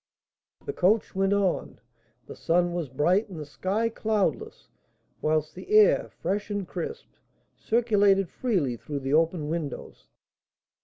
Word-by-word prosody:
The 425 - -4
coach 215 - +2
went 195 0 +1
on. 200 -3 0 0.5
The - - -10
sun 175 +1 +1
was 170 -5 -3
bright, 175 - +1
and 175 -5 -8
the 150 - -6
sky 195 +9 -1
cloudless, 220 - -2 0.5
whilst 155 0 0
the 370 - -11
air, 430 - +5
fresh 200 +4 -3
and 205 -3 -3
crisp, 460 +1 -5 0.5
circulated 205 -4 +2
freely 175 - -1
through 140 +3 -5
the 135 +1 -2
open 160 0 +2
windows. 160 -2 -5
190 Hz, 135 wpm, -26 LUFS, 160-215 Hz, 0.5 s, air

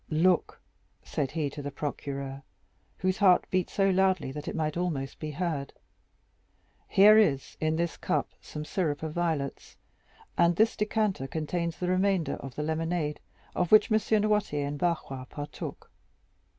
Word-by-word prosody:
"Look," 170 +3 +2 0.4
said 140 -3 -2
he 155 0 -1
to 145 - -7
the 145 - -4
procureur, 140 -1 -5 0.6
whose 185 0 0
heart 185 -3 +5
beat 185 -2 +1
so 195 -1 +2
loudly 185 -6 +2
that 150 +1 -7
it - - -3
might 155 -2 -1
almost 160 -7 -2
be 155 - -4
heard, 150 -3 -3 1.1
"here 210 +2 +7
is 140 -11 +1
in 155 0 +1
this 170 +1 -1
cup - - 0
some 150 0 -7
syrup 155 -3 -1
of 155 -1 -3
violets, 160 -5 -2 0.6
and 170 0 +5
this 220 +4 +3
decanter 210 - 0
contains 165 +3 -2
the 180 - -2
remainder 185 -2 +1
of 135 -2 -9
the 150 - -2
lemonade 160 -1 -1 0.4
of 180 -2 0
which 215 +2 +6
M. 215 - +5 0.2
Noirtier 205 -9 +1
and 145 0 -4
Barrois 155 -7 -1
partook. 145 +3 -7
165 Hz, 150 wpm, -29 LUFS, 145-185 Hz, 1.1 s, here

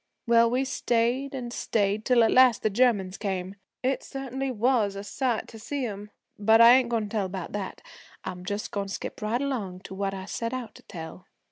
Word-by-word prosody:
Well, 230 -1 +5
we 255 +3 +1
stayed 250 +2 0
and 240 -2 -5
stayed, 210 -2 0
till 245 -2 +5
at 225 - +3
last 255 -3 +5
the 215 - +2
Germans 205 -5 +2
came. 190 -2 -3 0.3
It 265 +1 +1
certainly 270 0 -4
was 230 -4 +1
a 200 - -5
sight 240 +2 -1
to 225 - -11
see 275 +4 -3
'em 205 -2 -6 0.3
but 220 +2 +5
I 230 +1 +10
ain't 255 -2 +4
goin' 230 -2 0
to 210 - -6
tell 205 -3 -1
about 185 -2 -6
that, 200 -2 -5 0.4
I'm 180 -1 -6
just 205 +3 -4
goin' 200 -1 -2
to 195 - -6
skip - - -7
right 230 +5 0
along 205 -10 -3
to 195 - -9
what 195 0 -2
I 190 0 -6
set 230 +4 -3
out 245 -4 -6
to - - -15
tell. 165 +1 -9
225 Hz, 215 wpm, -27 LUFS, 195-250 Hz, 0.4 s, I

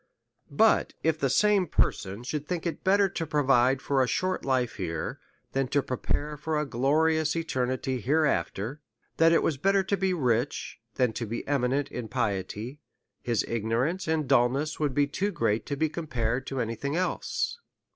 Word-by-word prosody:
But 220 +10 +3
if 160 -1 +1
the 135 - +1
same 200 +5 +3
person 100 +4 0
should 145 +3 -4
think 175 -2 -3
it 170 - -3
better 195 +1 +4
to 170 -4 -4
provide 135 -3 +3
for 135 -2 +2
a 130 - +2
short 185 +7 -1
life 130 -4 0
here, 80 -5 -3 0.3
than 135 -1 0
to 140 +1 +1
prepare 145 +3 -2
for 155 +1 -2
a 150 - 0
glorious 155 +5 +2
eternity 130 -5 -1
hereafter, 145 -2 0 0.4
that 165 0 +5
it 165 - +4
was 150 - 0
better 195 +6 +2
to 195 +1 0
be 190 0 0
rich 125 -8 -1 0.2
than 125 -3 +2
to 115 - -4
be 115 +3 -5
eminent 135 0 0
in 120 -2 -5
piety, 110 +2 -3 0.4
his 120 -2 0
ignorance 115 - -1
and 160 -3 0
dulness 135 +7 +2
would 145 -4 0
be 145 - +4
too 185 +8 -1
great 115 - 0
to 140 - -2
be 160 +3 +1
compared 130 -6 -2
to 135 - -3
any 115 -1 -1
thing 140 +6 -3
else. 185 - -1
140 Hz, 175 wpm, -28 LUFS, 125-160 Hz, 0.4 s, that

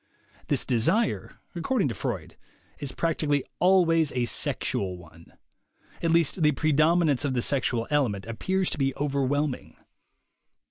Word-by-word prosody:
This - - 0
de 120 -3 +1
sire, 205 - 0 0.2
according 190 - 0
to - - -3
Freud, 105 - -5 0.4
is 140 -3 -4
practically 150 -4 0 0.2
always 165 -4 +3
a 125 -1 0
sexual 95 -5 -1
one; 85 -1 -16 0.7
at 165 - 0
least 165 +1 +2
the 150 -1 +4
predominance 155 0 +2
of 135 -3 -1
the 120 - +1
sexual 120 -4 +1
element 120 -10 0
appears 185 +12 -1
to - - -4
be 135 -1 0
overwhelming. 140 0 -1
145 Hz, 135 wpm, -26 LUFS, 125-165 Hz, 0.7 s, the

